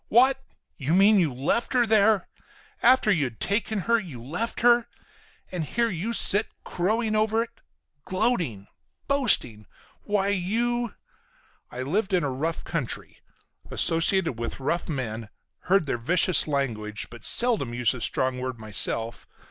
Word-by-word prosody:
"What! 260 Hz, +4 st, +4 dB, 0.4 s
You 150 Hz, +4 st, 0 dB
mean 200 Hz, +2 st, +5 dB
you 165 Hz, -6 st, +1 dB
left 140 Hz, -, -1 dB
her 245 Hz, -2 st, +3 dB
there! 220 Hz, -1 st, +3 dB, 0.5 s
After 250 Hz, -3 st, +4 dB
you'd 135 Hz, -, -1 dB
taken 210 Hz, +1 st, -1 dB
her, 230 Hz, +4 st, +2 dB
you 165 Hz, -, -9 dB
left 170 Hz, -, -4 dB
her! 240 Hz, 0 st, +4 dB, 0.6 s
And 180 Hz, -3 st, -3 dB
here 230 Hz, +8 st, -1 dB
you 190 Hz, +6 st, -3 dB
sit 210 Hz, -2 st, +3 dB, 0.2 s
crowing 215 Hz, +5 st, -1 dB
over 220 Hz, +1 st, +1 dB
it! 230 Hz, -, -12 dB, 0.5 s
Gloating! 170 Hz, -, -1 dB, 0.4 s
Boasting! 130 Hz, -, +2 dB, 0.3 s
Why 200 Hz, -1 st, -1 dB
you—!" 230 Hz, +4 st, -1 dB, 0.7 s
I 125 Hz, +1 st, -6 dB
lived 190 Hz, +7 st, -1 dB
in 175 Hz, -, +1 dB
a 140 Hz, -, -1 dB
rough 155 Hz, +6 st, -3 dB
country. 150 Hz, -8 st, -5 dB, 0.5 s
Associated 165 Hz, -, +1 dB
with 115 Hz, -, -5 dB
rough 170 Hz, +7 st, -2 dB
men, 115 Hz, -7 st, -4 dB, 0.4 s
heard 190 Hz, -2 st, +2 dB
their 120 Hz, -4 st, -2 dB
vicious 175 Hz, +8 st, +2 dB
language, 115 Hz, -8 st, -3 dB
but 120 Hz, -2 st, -12 dB
seldom 230 Hz, -, +4 dB
used 120 Hz, -3 st, +2 dB
a 125 Hz, -, -8 dB
strong 130 Hz, +3 st, 0 dB
word 130 Hz, -1 st, -5 dB
myself. 110 Hz, +1 st, -2 dB
180 Hz, 140 wpm, -25 LUFS, -, 0.7 s, mean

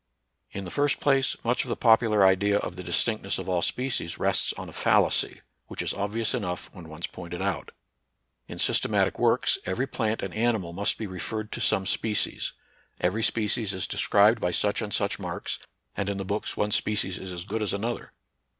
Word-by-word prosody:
In 100 Hz, -, -6 dB
the 90 Hz, -, -7 dB
first 145 Hz, 0 st, +1 dB
place, 135 Hz, -2 st, +2 dB
much 120 Hz, +1 st, +1 dB
of 125 Hz, -, -8 dB
the -, -, 0 dB
popular 110 Hz, -3 st, +4 dB
idea 100 Hz, +2 st, +4 dB
of 90 Hz, -, -4 dB
the 90 Hz, -, -7 dB
distinctness 100 Hz, +4 st, 0 dB
of -, -, -6 dB
all 90 Hz, -2 st, +1 dB
species 125 Hz, -7 st, -1 dB
rests -, -, +2 dB
on -, -, -8 dB
a -, -, -9 dB
fallacy, -, -, +2 dB, 0.3 s
which -, -, -4 dB
is -, -, -1 dB
obvious 105 Hz, +3 st, -1 dB
enough 90 Hz, -3 st, -3 dB
when 85 Hz, -4 st, -11 dB
once 80 Hz, +2 st, -5 dB
pointed 90 Hz, -1 st, -8 dB
out. 95 Hz, -2 st, -2 dB, 0.8 s
In -, -, -8 dB
systematic -, -, +2 dB
works, -, -, +3 dB
every 95 Hz, +8 st, -1 dB
plant 110 Hz, -5 st, -2 dB
and 95 Hz, -, -4 dB
ani 115 Hz, +1 st, +2 dB
mal 85 Hz, -4 st, -7 dB
must 100 Hz, +3 st, +1 dB
be 110 Hz, -, -4 dB
referred 105 Hz, +3 st, -4 dB
to -, -, -4 dB
some 95 Hz, -3 st, +2 dB
species, 105 Hz, +2 st, 0 dB, 0.5 s
every 95 Hz, +5 st, 0 dB
species 110 Hz, -1 st, +1 dB
is 95 Hz, -, -2 dB
described 105 Hz, +3 st, +4 dB
by 90 Hz, -, +1 dB
such 100 Hz, +4 st, +1 dB
and 105 Hz, -2 st, -4 dB
such -, -, 0 dB
marks, -, -, -4 dB, 0.4 s
and 100 Hz, -, -2 dB
in 100 Hz, -, -2 dB
the 95 Hz, -, -4 dB
books 100 Hz, +3 st, -2 dB
one 105 Hz, 0 st, 0 dB
species 105 Hz, -3 st, +1 dB
is 95 Hz, -, -7 dB
as 90 Hz, -1 st, -5 dB
good 110 Hz, +2 st, -3 dB
as 105 Hz, -, 0 dB
another. 115 Hz, +4 st, -3 dB
100 Hz, 195 wpm, -27 LUFS, 95-110 Hz, 0.8 s, popular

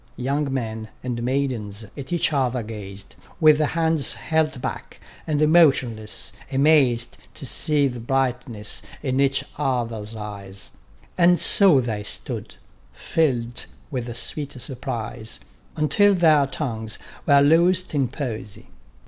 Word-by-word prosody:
Young 140 Hz, +3 st, -1 dB
men, 110 Hz, -4 st, -3 dB, 0.2 s
and 120 Hz, -2 st, -3 dB
maidens 120 Hz, -5 st, -2 dB
at 140 Hz, +1 st, -8 dB
each 170 Hz, -2 st, +1 dB
other 125 Hz, -3 st, 0 dB
gaz'd 100 Hz, -3 st, -9 dB, 0.2 s
With 155 Hz, -2 st, +6 dB
hands 160 Hz, -2 st, +2 dB
held 155 Hz, +4 st, 0 dB
back, -, -, -6 dB, 0.3 s
and 155 Hz, -1 st, +2 dB
motionless, 130 Hz, -10 st, +3 dB, 0.2 s
amaz'd 135 Hz, -4 st, +3 dB, 0.2 s
To -, -, -7 dB
see 150 Hz, -2 st, +2 dB
the 125 Hz, -2 st, -5 dB
brightness 125 Hz, -3 st, -2 dB, 0.2 s
in 130 Hz, -2 st, 0 dB
each 135 Hz, -1 st, +2 dB, 0.2 s
others' 115 Hz, -6 st, -2 dB
eyes; 100 Hz, -2 st, -7 dB, 0.5 s
And 175 Hz, 0 st, +5 dB
so 185 Hz, -10 st, +6 dB
they 110 Hz, -4 st, -3 dB
stood, 105 Hz, -, -5 dB, 0.4 s
fill'd 120 Hz, -7 st, -1 dB, 0.3 s
with 125 Hz, -3 st, -3 dB
a 115 Hz, -, -6 dB
sweet 140 Hz, +3 st, -2 dB
surprise, 115 Hz, -, -5 dB, 0.4 s
Until 205 Hz, +6 st, +3 dB
their 155 Hz, -5 st, +4 dB
tongues 115 Hz, -6 st, -4 dB, 0.3 s
were 140 Hz, -2 st, +6 dB
loos'd 175 Hz, +5 st, +3 dB
in 140 Hz, -3 st, +1 dB
poesy. 115 Hz, -6 st, -6 dB
130 Hz, 125 wpm, -23 LUFS, 115-150 Hz, 0.5 s, With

